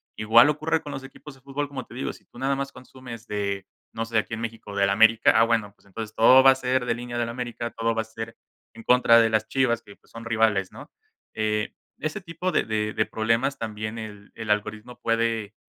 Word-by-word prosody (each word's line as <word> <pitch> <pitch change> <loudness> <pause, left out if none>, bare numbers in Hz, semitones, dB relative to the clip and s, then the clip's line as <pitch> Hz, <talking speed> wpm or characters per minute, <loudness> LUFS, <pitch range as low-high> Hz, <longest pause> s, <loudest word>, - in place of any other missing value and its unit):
igual 115 +6 +6
ocurre 155 +2 0
con 145 - -8
los 135 - -6
equipos 135 +1 -12
de 135 - -22
fútbol, 140 +2 -3
como 130 -3 -6
te - - -15
digo, 130 - -3
si - - -17
tú 120 - -15
nada 135 +1 +1
más 140 0 -4
consumes 125 -2 -11
de 100 -2 -3 0.2
no 115 0 -3
sé, 115 -1 +1
aquí 110 - -4
en 115 - -7
México, 115 -3 -6
del 100 0 +2
América, 110 +2 +5
ah, 115 - +6
bueno, 110 -3 0
pues 100 - -27
entonces 110 +2 -7
todo 130 +4 +7
va 135 - +9
a 130 - +2
ser 130 -1 0
de 120 - +1
línea 120 0 -6
del 120 - 0
América, 120 -1 -5
todo 115 0 -1
va 110 - 0
a - - -16
ser 110 0 -8 0.4
en 115 - -11
contra 125 -2 +6
de 115 -1 +3
las 110 0 +1
Chivas 125 -3 +1
que, 100 - -15
pues, - - -29
son 115 0 -9
rivales, 110 -4 +1
¿no?, - - -12 0.4
eh, 105 0 -1 0.2
ese 155 +7 -4
tipo 175 +2 -3
de - - +2
de 110 -1 -1
de 110 - +1
problemas 115 +5 0
también 110 0 -5
el 105 -2 -9
el 110 -2 -7
algoritmo 110 +3 -3
puede, 115 -2 -1
115 Hz, 235 wpm, -25 LUFS, 110-125 Hz, 0.4 s, va